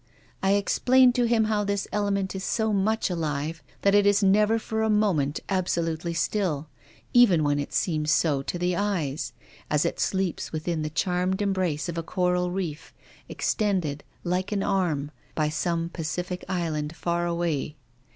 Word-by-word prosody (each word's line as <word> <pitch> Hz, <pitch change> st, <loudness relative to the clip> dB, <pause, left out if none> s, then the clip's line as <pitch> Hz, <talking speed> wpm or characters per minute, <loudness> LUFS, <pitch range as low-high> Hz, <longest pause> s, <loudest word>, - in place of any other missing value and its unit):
I 195 Hz, +1 st, +3 dB
explained 245 Hz, +5 st, +4 dB
to 245 Hz, -, +1 dB
THE -, -, +3 dB
RAINBOW. 235 Hz, 0 st, +2 dB
33 -, -, +2 dB
him 220 Hz, -, +4 dB
how 215 Hz, -1 st, +1 dB
this 200 Hz, 0 st, -1 dB
element 200 Hz, -2 st, -1 dB
is 190 Hz, -, -4 dB
so 220 Hz, +1 st, 0 dB
much 210 Hz, +1 st, +1 dB
alive 155 Hz, -1 st, -2 dB, 0.2 s
that 200 Hz, -, +4 dB
it 205 Hz, 0 st, +5 dB
is 205 Hz, 0 st, +4 dB
never 210 Hz, +3 st, +4 dB
for 220 Hz, 0 st, -3 dB
a 220 Hz, -, +1 dB
moment 185 Hz, -10 st, +1 dB
absolutely 170 Hz, -3 st, -1 dB
still, 165 Hz, -5 st, -1 dB, 0.5 s
even 200 Hz, -10 st, +6 dB
when 145 Hz, 0 st, +1 dB
it 145 Hz, -, -4 dB
seems 155 Hz, -4 st, 0 dB
so 150 Hz, -3 st, +2 dB
to 155 Hz, -, -4 dB
the 180 Hz, 0 st, 0 dB
eyes, 160 Hz, -10 st, -1 dB, 0.4 s
as 150 Hz, +2 st, +2 dB
it 170 Hz, -, -2 dB
sleeps 190 Hz, -2 st, -1 dB
within 160 Hz, +1 st, -2 dB
the 155 Hz, -, -2 dB
charmed 180 Hz, +4 st, 0 dB
embrace 185 Hz, -6 st, 0 dB
of 170 Hz, -1 st, -3 dB
a -, -, -1 dB
coral 180 Hz, +1 st, 0 dB
reef, 175 Hz, -5 st, -5 dB, 0.3 s
extended, 180 Hz, -9 st, -1 dB, 0.2 s
like 180 Hz, +3 st, -1 dB
an 200 Hz, -2 st, 0 dB
arm, 160 Hz, -7 st, 0 dB, 0.2 s
by 155 Hz, -1 st, +1 dB
some 165 Hz, +1 st, -1 dB
Pacific 180 Hz, +2 st, -4 dB
island 160 Hz, -4 st, -2 dB
far 175 Hz, 0 st, -1 dB
away. 170 Hz, -4 st, -1 dB
180 Hz, 170 wpm, -26 LUFS, 160-200 Hz, 0.5 s, even